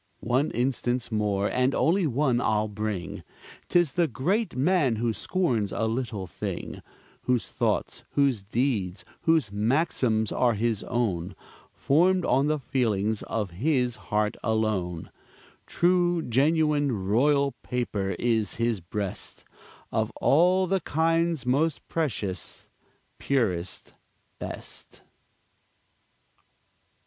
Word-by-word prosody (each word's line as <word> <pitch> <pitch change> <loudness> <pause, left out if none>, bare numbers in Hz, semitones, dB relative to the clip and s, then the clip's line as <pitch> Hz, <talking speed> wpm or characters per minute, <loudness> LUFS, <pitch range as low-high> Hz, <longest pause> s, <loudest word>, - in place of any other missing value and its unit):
One 130 +6 +2
instance 125 -1 -1
more, 105 -2 +1
and 125 +2 +1
only 175 +1 +2
one, 130 -2 +1
I'll 110 -1 +1
bring; 105 -3 -4 0.5
'Tis 175 -5 +3
the 175 -2 +2
great 190 - -1
man 140 -3 +2
who 115 +1 0
scorns 120 - 0
a 115 - -1
little 110 -4 -2
thing, 85 - -5 0.4
Whose 125 -2 +1
thoughts, - - -1
whose 135 -7 +2
deeds, 110 -2 -1 0.2
whose 160 -11 +3
maxims, 110 -1 +1
are 120 -3 +2
his 110 -1 0
own, 95 -7 -1 0.4
Formed 180 +5 +2
on 135 +3 +3
the 155 0 +1
feelings 110 -6 0
of 105 -5 -3
his 125 - 0
heart 105 +1 +1
alone; 105 -7 -1 0.6
True 175 -1 +2
genuine 145 - +2
royal 140 +6 +3
paper 105 -6 -2
is 110 -4 0
his 115 -2 0
breast, 100 +3 -5 0.5
Of - - 0
all 180 +5 +4
the 190 +1 0
kinds 165 -2 +1
most 145 +5 0
precious, 110 - -3 0.5
purest, 100 -11 -1 0.5
best. - - -8
125 Hz, 110 wpm, -27 LUFS, 105-150 Hz, 0.6 s, all